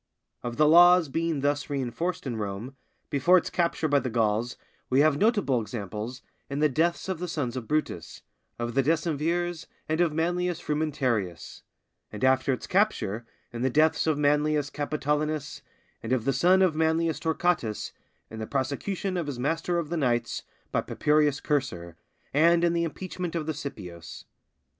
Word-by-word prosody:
Of 120 -1 -5
the 150 0 +5
laws 175 0 +7
being 165 0 -1
thus 145 +1 0
reinforced 145 +6 -2
in 125 -3 -3
Rome, 105 +5 -5 0.4
before 170 +6 +5
its 175 - -1
capture 170 -2 0
by 145 -1 +3
the 130 - -3
Gauls, 115 +1 0 0.3
we 130 +2 +4
have 155 -1 +4
notable 205 - +2
examples 110 +3 -6 0.3
in 140 - -3
the 155 +1 +4
deaths 165 +7 0
of 190 -4 -3
the 180 - -3
sons 140 -7 -3
of 125 -3 -5
Brutus, 150 - -2 0.3
of 120 0 -3
the 135 - +3
Decemvirs, 165 +3 -1 0.2
and 155 +2 +1
of 170 -3 +3
Manlius 175 +2 -1
Frumentarius; 130 - -2 0.5
and 105 +1 -7
after 130 +1 +3
its 130 - -3
capture, 120 - 0 0.3
in 120 - -5
the 130 - +2
deaths 155 +4 +3
of 155 -2 +2
Manlius 150 0 +2
Capitolinus, 150 0 -2 0.4
and 115 - -5
of 125 -3 0
the 135 - +2
son 180 +8 +4
of 175 -4 +2
Manlius 160 +1 +1
Torquatus 160 -9 -1 0.4
in 110 - -7
the 110 - -4
prosecution 175 +8 -2
of 170 -4 -2
his 140 -4 -4
master 165 +6 -1
of 165 -3 -2
the 170 - -2
knights 120 -5 0 0.3
by - - +1
Papirius 150 -1 +1
Cursor, 95 - -2 0.4
and 170 +4 +4
in 170 0 +3
the 170 0 +1
impeachment 180 +2 -5
of 160 -2 -2
the 160 - -2
Scipios. 90 - -8
150 Hz, 165 wpm, -27 LUFS, 125-165 Hz, 0.5 s, laws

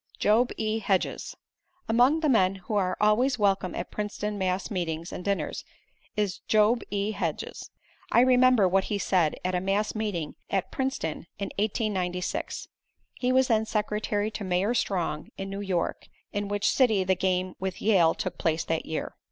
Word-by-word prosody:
Job 230 +4 +3
E. 220 0 0
Hedges 195 -3 -1 0.5
Among 250 +8 +4
the 310 - +2
men 195 -8 +4
who 190 +3 -7
are 185 -3 +1
always 240 +6 +3
welcome 195 -3 +1
at 175 - -5
Princeton 210 0 -3
mass 190 +1 -1
meetings 170 -3 -3
and - - -6
dinners, 200 0 -2 0.5
is 205 -3 0
Job 215 +2 +4
E. 205 +1 -1
Hedges. - - -4 0.4
I 235 - +6
remember 255 -4 +5
what 190 +1 +2
he 205 - -1
said 180 -5 +2
at 185 - 0
a 180 - +1
mass 200 +3 0
meeting 205 -8 -3 0.2
at 195 -2 -1
Princeton 260 - -3
in 200 -1 -4
1896. 190 -4 -2 0.5
He 250 0 -1
was 260 0 +4
then 220 -1 +2
secretary 210 0 -1
to 215 - -5
Mayor 190 +4 +1
Strong, 175 -9 -1
in 195 0 -5
New 200 +1 -4
York, 185 -4 -2 0.3
in 205 0 -2
which 205 +1 0
city 220 -7 +3
the 190 0 +2
game 185 0 0
with 190 -1 -3
Yale 185 -7 +4
took - - -4
place 160 0 +1
that 165 -1 -2
year. 160 - -3
200 Hz, 170 wpm, -27 LUFS, 185-220 Hz, 0.5 s, I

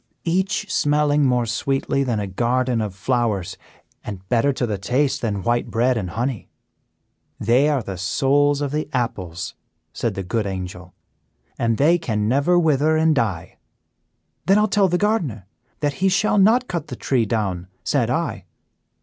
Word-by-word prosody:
Each 190 +4 0
smelling 145 -1 +2
more 125 -2 +2
sweetly 135 +4 -1
than 120 -5 -1
a 105 - -2
garden 120 +4 0
of 105 -3 -4
flowers, 105 -4 -1 0.5
and 95 -2 -8
better 120 +4 +3
to 130 -2 -1
the 105 -4 -3
taste 135 +7 0
than 100 -5 -2
white 120 0 0
bread 125 +3 +2
and 100 -6 -3
honey. 115 +1 -3 0.9
"'They 125 +7 +3
are 120 -10 -2
souls 140 +8 +2
of 145 -2 -2
the 150 0 -2
apples,' 95 -9 -3 0.4
said - - -2
the 95 - -3
good 105 +3 -1
Angel,' 90 -2 -6 0.6
and 115 -1 +1
they 165 +5 +4
can 105 -9 -1
never 140 +9 +3
wither 155 -1 +3
and 160 0 +3
die.' 105 - -2 0.9
"'Then 195 +2 +5
I'll 210 0 +3
tell 200 -1 +3
the 180 0 +1
gardener 170 - -1 0.4
that 145 -1 0
he 190 - +4
shall 200 +2 +2
not 235 +6 +4
cut 170 -4 -4
the - - -6
tree 120 -5 0
down,' 95 -5 -2 0.2
said - - +1
I." - - -2
125 Hz, 160 wpm, -22 LUFS, 105-150 Hz, 0.9 s, Then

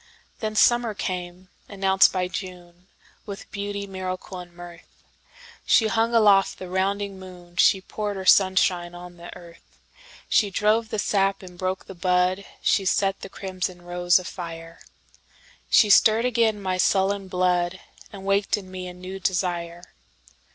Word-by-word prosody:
Then 215 -1 -3
summer 240 -1 +3
came, 180 -1 -5 0.2
announced 195 -1 +3
by 185 -1 -1
June, 180 -1 -9 0.4
With 200 0 -9
beauty, 200 0 -4
miracle 185 -1 -6
and 175 -1 -11
mirth. 175 -1 -12 0.8
She 225 - +4
hung 230 +1 +1
aloft 205 -3 +4
the 185 -1 -9
rounding 195 +1 -1
moon, 180 -2 -13
She 190 - +4
poured 205 +1 -4
her 190 -1 -6
sunshine 185 -2 +3
on 175 0 -11
the 170 0 -11
earth, 170 -1 -17 0.5
She 210 - +3
drove 215 +3 +1
the 215 - -3
sap 195 -1 0
and 180 -1 -11
broke 185 +1 -3
the - - -9
bud, 180 +1 +1 0.2
She 200 - +2
set 195 +1 +1
the 195 - -8
crimson 185 -2 -5
rose 175 0 +2
afire. 165 -2 -7 0.9
She 210 -3 +5
stirred 225 +3 +5
again 230 -3 +1
my 185 -2 -2
sullen 195 +1 +1
blood, 180 0 0 0.3
And 195 -2 -10
waked 200 +1 +1
in 190 -2 -10
me 185 -1 -6
a 180 - -9
new 185 +2 -8
desire. 175 -2 -2
185 Hz, 150 wpm, -24 LUFS, 180-200 Hz, 0.9 s, She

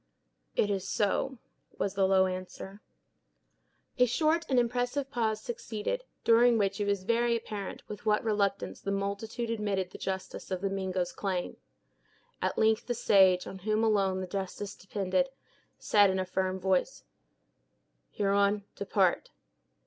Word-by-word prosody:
"It 205 - +2
is 190 -1 -2
so," 245 +6 0 0.4
was 195 - -1
the 195 -1 +2
low 190 0 +5
answer. 185 +2 -6 1.2
A 250 - +6
short 315 +7 +1
and 260 - +2
impressive 245 +3 0
pause 220 -3 0
succeeded, 240 - -4 0.2
during 235 +1 +5
which 205 0 0
it 205 - 0
was 200 -2 0
very 235 +2 +2
apparent 210 -3 -6
with 210 - -8
what 210 -1 +2
reluctance 205 -3 -1
the - - -4
multitude 200 +4 -2
admitted 200 -4 -1
the - - -10
justice 190 -1 -5
of 185 -2 -2
the 195 -1 -1
Mingo's 185 -2 -2
claim. 185 -3 -3 0.9
At - - -1
length 220 0 +2
the 245 - -1
sage, 190 -5 +4
on 190 - -8
whom 215 +3 0
alone 195 -4 +2
the - - -3
decision 195 +2 -5
depended, 200 +8 0 0.5
said, 205 -2 +4
in 190 - 0
a 185 - -1
firm 185 0 -1
voice: 190 - 0 1.1
"Huron, 200 0 +1
depart." - - +1
200 Hz, 145 wpm, -30 LUFS, 190-230 Hz, 1.2 s, A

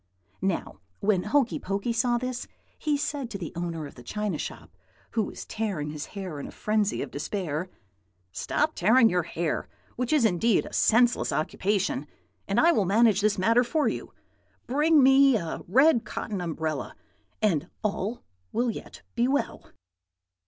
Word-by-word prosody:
"Now 190 -2 -2 0.2
when 200 -3 +2
Hokey 240 +2 +2
Pokey 200 +5 -2
saw 240 +1 +2
this, 255 0 -4 0.3
he 300 -2 +1
said 280 -3 -3
to 210 - -5
the 175 -5 -6
owner 170 -2 -3
of 145 - -10
the 125 - -13
china 200 - -3
shop, 85 - -7 0.4
who 225 - +1
was 205 - -5
tearing 190 -10 -3
his 150 -1 -6
hair 185 -7 -5
in - - -6
a - - -9
frenzy 210 -1 0
of - - -8
despair, 165 +1 -3 0.6
'Stop 300 - 0
tearing 230 +1 +5
your 180 0 +2
hair, 165 -1 -3 0.3
which 250 0 -1
is 300 -6 +4
indeed 220 +3 +2
a - - -10
senseless 240 +2 +3
occupation, 190 +5 -1 0.4
and - - +1
I 340 - +6
will 210 - +2
manage 210 +1 +4
this 210 0 +2
matter 230 +6 +4
for 295 +5 +1
you. - - -3 0.5
Bring 295 +3 +4
me 270 0 +6
a 165 -5 -4
red 255 - +5
cotton 215 -2 -4
umbrella, 160 -2 -3 0.4
and 175 -6 +1
all 215 +2 -2 0.3
will 235 +1 +1
yet - - -10
be 240 +1 +2
well.' 285 +2 -2
215 Hz, 160 wpm, -27 LUFS, 180-245 Hz, 0.6 s, I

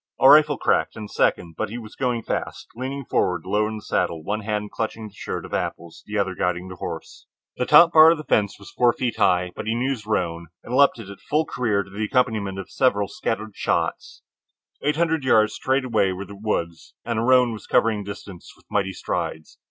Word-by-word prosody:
A 130 - +6
rifle 150 0 +7
cracked, - - +1
and 105 -1 -7
a - - -15
second, 85 -2 +1
but 110 - -1
he 115 - -6
was 110 -3 -10
going 125 -3 -1
fast, - - -4
leaning 135 +2 -5
forward, 90 -7 0
low 105 +3 +1
in 110 - -5
the 105 - -8
saddle, 80 -2 -1
one 105 +5 -2
hand 105 -1 -3
clutching 110 -1 -4
the - - -24
shirt - - -5
of - - -11
apples, 85 -1 -4
the 105 0 -3
other 100 -2 0
guiding 90 0 -2
the 90 - -9
horse. - - -7 0.3
The 125 - -1
top 165 +3 +7
bar 155 0 +9
of 165 - +3
the 155 - -7
fence 105 -8 +1
was 100 - -13
four 120 -1 +3
feet 120 -2 -2
high, 90 -4 +2
but - - -6
he 110 - 0
knew 130 +3 0
his 110 -6 -5
roan 85 -5 -1 0.2
and 125 - -4
leaped 140 -1 +5
it 115 -4 -9
at 100 - -10
full 155 +2 0
career 105 -8 0
to 100 - -17
the 105 +2 -3
accompaniment 105 -5 0
of 95 - -7
several 105 -6 +2
scattered 110 -2 -4
shots. - - -2 0.6
Eight 150 +1 +1
hundred 160 -2 +1
yards 110 -4 +4
straight 130 0 0
away 110 -6 +2
were 95 +2 -6
the 100 - -11
woods, 85 -5 -4
and 115 -2 -1
the - - 0
roan 125 -1 +4
was 110 - -10
covering 110 -2 +2
the 100 - -9
distance 100 -3 -9
with - - -25
mighty 95 -2 0
strides. 80 -2 -4
110 Hz, 230 wpm, -23 LUFS, 100-125 Hz, 0.6 s, bar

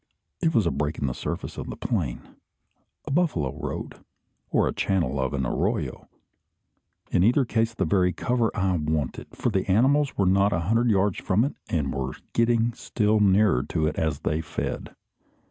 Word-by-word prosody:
It 165 -2 +3
was 110 - +4
a 85 - +2
break 75 +1 -2
in - - -2
the 65 - -1
surface - - -5
of - - -6
the - - -5
plain, - - -3 0.7
a - - -5
buffalo 135 - +1
road, - - -5 0.5
or - - +2
the - - -1
channel 80 -8 0
of 65 -1 0
an 65 -1 -1
arroyo; - - -2 1.0
in 90 - +3
either 125 +6 +4
case 115 -1 0
the 95 - 0
very 90 +1 +2
cover 115 +6 0
I 95 -3 +1
wanted, 75 -3 -2
for 120 - -1
the 95 -1 -1
animals 135 +8 +3
were 100 - +2
not 100 +2 +3
a 85 - +1
hundred 115 +7 +2
yards 100 -2 +2
from 100 +5 +2
it, 140 - -3 0.2
and 75 -5 -1
were 65 -1 -3 0.2
getting 115 0 +2
still 110 -2 +1
nearer 100 -7 +4
to 80 +3 -1
it 75 - -1
as 80 -3 -1
they 75 +2 0
fed. 75 - -5
95 Hz, 180 wpm, -25 LUFS, 80-115 Hz, 1.0 s, was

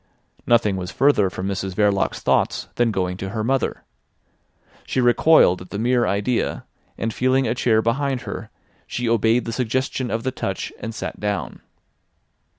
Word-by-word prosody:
Nothing 115 -5 +3
was 90 -1 -4
further 120 -5 +3
from 95 +1 -5
Mrs 95 -1 -3
Verloc's 100 -1 +1
thoughts - - +1
than 120 -1 +2
going 90 -3 -1
to 95 0 -5
her 110 +2 -3
mother. 135 +3 -1 1.0
She - - -2
recoiled 120 - +5
at 90 - -11
the 100 - -5
mere 120 +2 +2
idea, 105 +5 -1 0.3
and 115 -1 -2
feeling 130 0 +2
a 110 - +1
chair 110 -3 +2
behind 130 +2 0
her, - - -7 0.4
she 120 0 -3
obeyed 115 +1 +2
the 115 - -4
suggestion 130 +2 -1
of 115 - -2
the 130 - -1
touch, 95 -7 -4
and 115 0 -6
sat - - -5
down. 105 -2 -3
115 Hz, 160 wpm, -22 LUFS, 100-125 Hz, 1.0 s, recoiled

